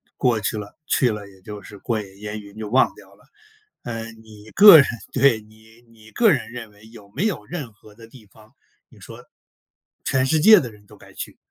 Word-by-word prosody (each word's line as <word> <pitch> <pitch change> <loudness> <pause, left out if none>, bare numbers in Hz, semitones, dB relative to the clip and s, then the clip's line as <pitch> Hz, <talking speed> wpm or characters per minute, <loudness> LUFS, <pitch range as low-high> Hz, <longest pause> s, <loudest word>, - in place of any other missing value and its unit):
过 120 -4 +1
去 110 +1 -3
了， 105 -1 -9
去 125 -3 +2
了 105 -1 -7
也 95 -1 -20
就 105 +1 -9
是 100 +1 -13
过 110 +2 -3
眼 100 -1 -14
烟 105 0 -6
云 100 0 -15
就 110 -1 -6
忘 130 +4 +2
掉 - - -18
了。 - - -26 0.6
呃， 115 -1 -6
你 110 -1 -16
个 205 -4 +10
人， 140 - +5 0.2
对 130 -4 +2
你 110 +2 -21
你 110 -1 -18
个 225 -3 +3
人 125 -5 -2
认 115 -3 -9
为 105 +2 -19
有 105 -3 -16
没 195 - -2
有 215 - -3
任 145 -10 -7
何 105 0 -20
的 115 +1 -15
地 115 -1 -17
方， 110 +4 -22 0.4
你 - - -20
说 - - -13 0.8
全 130 0 +1
世 155 +3 +1
界 215 +7 +8
的 125 -4 -7
人 105 -1 -20
都 - - -17
该 - - -17
去， - - -8
110 Hz, 235 characters per minute, -21 LUFS, 105-125 Hz, 0.8 s, 个